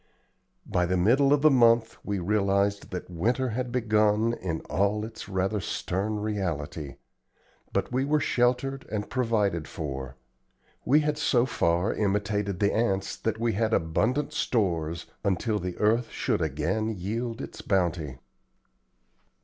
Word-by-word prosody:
By 90 0 0
the 90 +1 +1
middle 130 +10 +4
of 145 0 +3
the 155 - +7
month 115 -3 +4
we 100 -1 -2
realized 100 +1 +1
that 90 - -5
winter 120 +9 0
had 125 +2 -3
begun 110 -1 +2
in 85 -8 -3
all 105 +2 0
its 110 -2 -9
rather 95 +2 0
stern 100 +3 -2
reality; 85 -8 -3 0.8
but - - -1
we 130 +2 +1
were 150 +2 +2
sheltered 130 +1 0
and 105 -1 -3
provided 105 -10 0
for. 65 -4 -5 0.7
We 150 +4 +5
had 150 0 -1
so 130 -5 +3
far 90 -4 +1
imitated 105 -2 -1
the 100 -1 +2
ants 100 -4 0
that 110 -1 -2
we 115 -1 +1
had 110 +2 +1
abundant 110 - 0
stores 85 -8 0 0.2
until 105 +3 0
the 90 -1 -5
earth 115 +3 +2
should - - -1
again 80 +9 -1
yield 115 +4 -3
its - - -7
bounty. 85 -8 0
105 Hz, 140 wpm, -27 LUFS, 90-115 Hz, 0.8 s, the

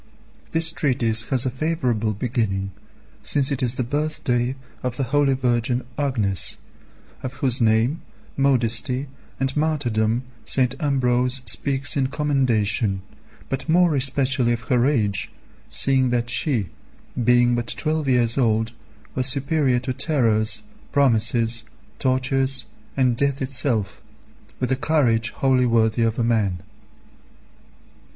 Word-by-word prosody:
This 160 0 +3
treatise 120 -8 +1
has 130 -2 +1
a 130 - 0
favourable 125 -8 -1
beginning, 105 -4 -2 0.5
since 140 -1 +2
it 135 - -2
is 125 -1 +1
the 130 - -1
birthday 130 -2 -1 0.3
of 125 -1 -4
the 140 - 0
holy 135 +1 +2
Virgin 125 0 0
Agnes, 115 -10 -1 0.6
of 130 0 -5
whose 130 -2 0
name, 115 +7 +2 0.3
modesty, 130 0 +1 0.3
and 135 0 -1
martyrdom 125 -7 0 0.2
St. 125 -1 +3
Ambrose 125 -3 0
speaks 135 +5 0
in 135 -2 +1
commendation, 120 -8 0 0.4
but 135 +4 -4
more 175 -1 +4
especially 130 -2 +2
of 115 - -4
her 125 +1 +1
age, 105 -9 0 0.4
seeing 130 -2 +2
that 120 -1 0
she, 120 - 0 0.5
being 120 +1 +4
but 120 0 -2
twelve 155 +1 -1
years 120 0 +2
old, 110 -2 +1 0.4
was 130 0 +1
superior 135 -1 +1
to 130 +1 -2
terrors, 120 -6 +1 0.3
promises, 115 -4 +1 0.4
tortures, 130 0 +1 0.3
and 130 -3 +2
death 140 +2 0
itself, 130 -6 0 0.6
with 125 0 -2
a - - +3
courage 125 -5 +1
wholly 130 -2 +1
worthy 115 -1 +2
of 115 0 +1
a 120 - 0
man. 105 -6 0
125 Hz, 125 wpm, -22 LUFS, 115-135 Hz, 0.6 s, more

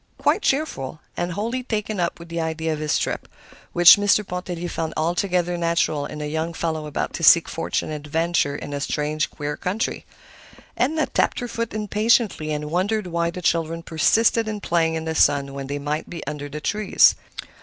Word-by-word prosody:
Quite - - +2
cheerful, 265 - -1 0.2
and 175 0 -2
wholly 230 +7 -2
taken 215 -4 -3
up 170 -1 -1
with 170 0 -12
the 170 0 -2
idea 160 0 -2
of 150 - -5
his 155 -1 +1
trip, - - -3 0.4
which 175 +2 +8
Mr. 205 0 +2
Pontellier 180 -1 -4
found 165 -2 -4
altogether 175 +1 0
natural 165 -3 0
in 150 - -7
a - - -3
young 160 +2 -3
fellow 160 -2 -2
about 150 - -3
to - - -5
seek - - +7
fortune 85 - -2
and 150 -1 -5
adventure 165 -2 +1
in 145 - -6
a 140 - -3
strange, 150 0 -1
queer 145 0 -4
country. 195 +5 -3 0.7
Edna 310 +5 +1
tapped - - 0
her 245 - -4
foot 230 -2 -4
impatiently, 210 -5 +1
and 150 0 -3
wondered 200 +4 0
why 170 -1 -1
the 180 +1 -7
children 165 0 0
persisted 220 +9 +2
in 215 -1 -3
playing 165 -4 +1
in 160 0 -3
the 160 - -2
sun 140 -3 +3
when 140 -1 -6
they 145 +1 -3
might 150 +2 -3
be 170 - -7
under 145 0 -5
the 150 +2 -6
trees. 210 +4 +4
170 Hz, 190 wpm, -23 LUFS, 150-205 Hz, 0.7 s, which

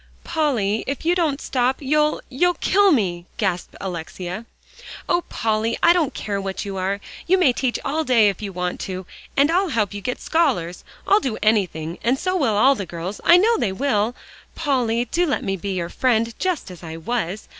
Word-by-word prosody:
"Polly, 250 -11 0
if 275 +3 -4
you 345 - +4
don't 320 -6 0
stop, 255 -1 0
you'll 300 +2 +1
you'll 350 +7 +1
kill 400 +3 +3
me," 180 - 0
gasped 190 -6 -2
Alexia. 180 +3 -5 0.6
"Oh, 350 - +2
Polly! 220 +1 0
I 340 - +7
don't 335 -6 0
care 200 -2 -3
what 195 +1 -4
you 200 -1 -5
are. 195 +2 -1 0.3
You 375 +2 +4
may 300 -9 +4
teach 255 -1 -1
all 310 +3 0
day 240 -7 +4
if 200 -1 -1
you 200 -2 -4
want 180 -1 -3
to, 185 -1 -5 0.3
and 285 +3 +4
I'll 370 +2 +2
help 220 -8 0
get 205 +1 -6
you 250 - 0
scholars. 245 - 0 0.2
I'll 405 - +5
do 260 - -3
anything, 180 -7 +1
and 245 +3 +2
so 370 +5 -1
will 250 - +1
all 265 +6 +6
the 200 -8 -5
girls; 175 +4 -6
I 345 - +7
know 450 +5 +4
they 195 - 0
will. 230 0 0 0.4
Polly, 245 -6 0
do 345 +8 0
let 285 - -1
me 195 -4 -1
be 195 +1 -4
your 170 -2 -2
friend 230 -1 +1
just 360 - -1
as 180 - -11
I 160 -2 -7
was. 200 +2 -3
230 Hz, 200 wpm, -22 LUFS, 195-295 Hz, 0.6 s, I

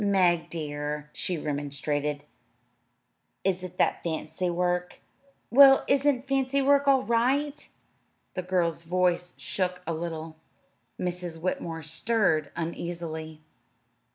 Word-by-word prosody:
"Meg, 185 -4 +3
dear," 150 -1 -4
she 180 - -2
remonstrated, 145 0 -2 1.2
"is 185 -1 +1
it 180 0 -8
that - - +2
fancy 160 +2 -2
work?" 180 0 -1 0.5
"Well, 270 +2 +8
isn't 275 -1 +2
fancy 275 0 +1
work 280 +1 +4
all 270 -2 +5
right?" 265 +6 +1 0.6
The 185 - -2
girl's 175 -3 0
voice 180 +1 0
shook 180 -1 -2
a 165 - -2
little. 160 -1 -5 0.6
Mrs. 180 -2 -3
Whitmore 165 -2 -3
stirred 160 -2 +1
uneasily. 165 -2 -5
175 Hz, 105 wpm, -27 LUFS, 160-200 Hz, 1.2 s, Well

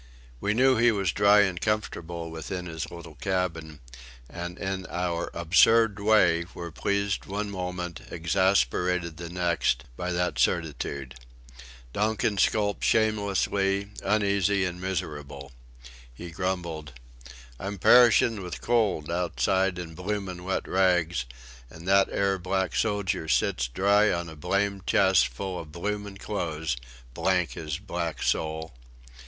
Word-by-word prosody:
We 105 +7 0
knew 130 +1 +4
he 120 +1 +5
was 100 -5 0
dry 100 +2 +5
and 95 -4 0
comfortable 85 -6 -2
within 90 +3 -5
his 80 -2 -5
little 85 -2 -10
cabin, 80 -3 -3 0.5
and 85 +5 -7
in 95 -1 -4
our 85 -1 -2
absurd 100 +5 +4
way 95 -6 +4
were 85 -1 -6
pleased 100 +6 -1
one 105 +1 -3
moment, 90 -3 -4
exasperated 90 -1 +1
the 85 0 -7
next, 90 0 0
by 90 +7 -3
that 90 0 -1
certitude. 70 -5 -1 0.8
Donkin 105 -1 0
skulked 105 0 +1
shamelessly, 100 -2 +1
uneasy 100 -1 +2
and 90 0 -5
miserable. 75 -7 -5 0.6
He 85 +8 -9
grumbled: 85 -5 -3 0.7
"I'm 100 +1 -4
perishin' 115 +1 +5
with 90 -1 -6
cold 105 -10 +1
outside 90 +3 +1
in 85 -2 -6
bloomin' 90 0 -4
wet 95 +1 -2
rags, 90 -6 +2 0.4
an' 80 +6 -12
that 95 +1 +4
'ere 100 -1 0
black 95 +1 -1
sojer 100 -5 0
sits 65 -3 +1
dry 100 - +3
on 85 -1 -2
a 80 - -10
blamed 100 +5 -1
chest 95 -2 +4
full 90 +10 -5
of 80 -2 -9
bloomin' 100 +3 -4
clothes; 80 - -3 0.4
blank 90 +4 +1
his 75 -2 -4
black 85 -4 -4
soul!" 80 -1 -1
90 Hz, 125 wpm, -27 LUFS, 85-100 Hz, 0.8 s, he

